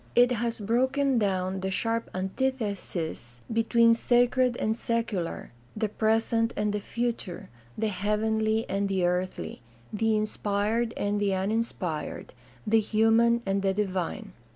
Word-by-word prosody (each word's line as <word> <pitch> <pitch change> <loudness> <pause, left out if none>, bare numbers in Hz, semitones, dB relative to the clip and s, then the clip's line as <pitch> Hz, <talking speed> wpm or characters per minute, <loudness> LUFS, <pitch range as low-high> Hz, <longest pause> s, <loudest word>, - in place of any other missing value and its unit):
It 245 +1 +6
has 235 -1 -1
broken 260 +4 +2
down 190 -2 0
the 190 0 -2
sharp 230 +4 -1
antithesis 190 - -3
between 230 +1 +4
sacred 245 +1 +2
and 220 +1 0
secular, 230 -7 -2 0.3
the 215 -1 0
present 225 +2 +1
and 210 0 0
the 210 - 0
future, 230 - -4 0.3
the 220 0 0
heavenly 220 +3 0
and 200 0 -1
the 190 -2 +1
earthly, 180 -6 -2 0.3
the 220 +1 +2
inspired 215 +2 -1
and 205 0 0
the 200 -2 +2
uninspired, 190 -5 -3 0.3
the 225 +1 +4
human 225 +2 +3
and 195 0 0
the 195 -1 +1
divine. 190 -4 -2
215 Hz, 130 wpm, -27 LUFS, 195-230 Hz, 0.3 s, It